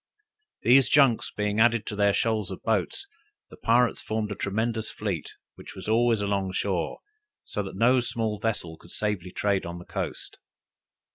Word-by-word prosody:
These 130 +1 +6
junks 135 -6 +4
being 105 0 -1
added 115 -1 +4
to 105 - -4
their 100 0 +3
shoals 110 -2 0
of 95 - -8
boats, 110 - 0 0.5
the - - -10
pirates 120 +1 +2
formed 110 -1 -2
a - - -3
tremendous 110 +3 -1
fleet, 100 -8 -4 0.2
which - - -12
was - - -8
always 115 0 +3
along 100 -2 -1
shore, 95 -3 -1 0.5
so 105 - -2
that 95 -1 -7
no 125 +5 +4
small 115 -3 -2
vessel 100 -7 -2
could 85 - -17
safely 105 -4 -2
trade 100 -1 0
on 85 +1 -6
the 85 - -10
coast. - - -5
105 Hz, 165 wpm, -27 LUFS, 100-115 Hz, 0.5 s, These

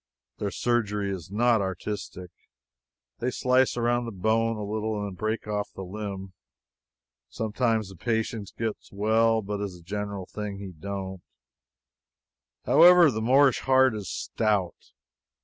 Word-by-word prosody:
Their 100 - -1
surgery 105 -3 0
is 90 -4 -6
not 115 +2 +3
artistic. 95 -1 -5 0.9
They 125 - 0
slice 130 0 +2
around 120 0 +1
the 115 - -5
bone 115 +3 +1
a 105 - -4
little, 110 +1 -2
then 100 -2 -5
break 110 +3 -3
off 105 -1 -2
the 95 - -6
limb. 95 0 -6 1.0
Sometimes 110 -1 -1
the 95 - -11
patient 110 +1 -2
gets 110 -2 -4
well; 110 +2 +2
but, 100 +1 -4
as 100 -3 -4
a 85 - -15
general 100 +1 -4
thing, 105 0 -6
he 100 -1 -7
don't. 95 +2 -6 1.4
However, 175 -3 +7
the 110 -2 -3
Moorish 135 +3 +4
heart 130 -1 +4
is 105 -3 -5
stout. 105 -5 -2
105 Hz, 135 wpm, -27 LUFS, 100-115 Hz, 1.4 s, However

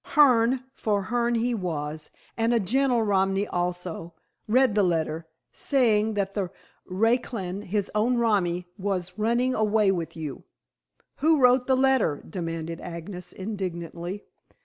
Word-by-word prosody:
Hearne, 255 -3 +5
for 205 -2 -1
Hearne 240 0 +2
he 240 +2 +1
was, 155 -6 -4 0.3
and 230 +1 +1
a - - +4
gentle 245 +3 +2
Romany 195 -1 +1
also, 175 -2 -4 0.3
read 250 +1 +4
the 210 - +3
letter, 165 -3 0 0.2
saying 220 -6 +2
that 200 -1 -1
the 195 -3 -2 0.4
raclan, 205 -1 0
his 200 +1 -1
own 230 +4 +2
romi, 185 -7 +1
was 185 -1 -3
running 235 +4 +2
away 215 -2 +3
with 170 -3 -4
you." 155 -4 -6 0.7
"Who 315 0 +3
wrote 250 0 +4
the 260 -1 +3
letter?" 260 - +2
demanded 165 -1 -5
Agnes 175 +2 -7
indignantly. 185 -2 -5
205 Hz, 130 wpm, -26 LUFS, 175-235 Hz, 0.7 s, Hearne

